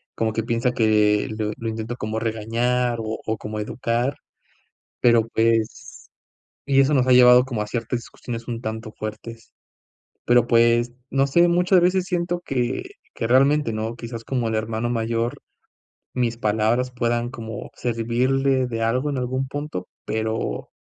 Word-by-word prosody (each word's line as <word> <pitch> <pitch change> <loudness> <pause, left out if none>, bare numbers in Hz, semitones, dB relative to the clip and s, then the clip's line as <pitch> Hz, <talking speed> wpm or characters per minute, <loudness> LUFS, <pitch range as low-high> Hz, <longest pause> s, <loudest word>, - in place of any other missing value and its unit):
como 110 -1 0
que 115 - -1
piensa 115 +2 0
que 105 -3 +3
lo 105 -1 -1
lo 115 - -4
intento 110 +1 -4
como 110 -2 -3
regañar 115 +2 0
o 110 0 -4
o 110 0 -1
como 105 +1 -6
educar, 120 +4 -1 0.9
pero 115 -2 +4
pues 115 -1 0 0.7
y 135 -1 +5
eso 135 +2 +3
nos 130 -2 +3
ha 130 - +4
llevado 125 0 +7
como 120 -5 -3
a - - -5
ciertas 120 +1 -3
situaciones 115 -1 -8
un 115 -1 -3
tanto 110 -1 -5
fuertes. 110 +2 -7 0.7
Pero 120 -1 +4
pues, 120 +1 +3 0.2
no 135 0 +2
sé, 170 +5 +5
muchas 180 +2 +4
veces 180 +1 +2
siento 175 -1 -1
que 125 - -1 0.3
que 115 - -2
realmente 135 +1 +3
no 110 +1 -3
quizás 115 -1 -7
como 125 -3 -1
el 110 - -2
hermano 110 +2 -2
mayor, 115 0 -1 0.8
mis 120 -2 -1
palabras 110 +3 +1
puedan 120 -1 -1
como 110 -3 -7
servirle 125 +3 +1
de 115 -2 -4
algo 125 +6 0
en 140 - -2
algún 130 +1 -2
punto, 145 -10 -5 0.2
pero 110 0 -2
120 Hz, 155 wpm, -23 LUFS, 110-125 Hz, 0.9 s, llevado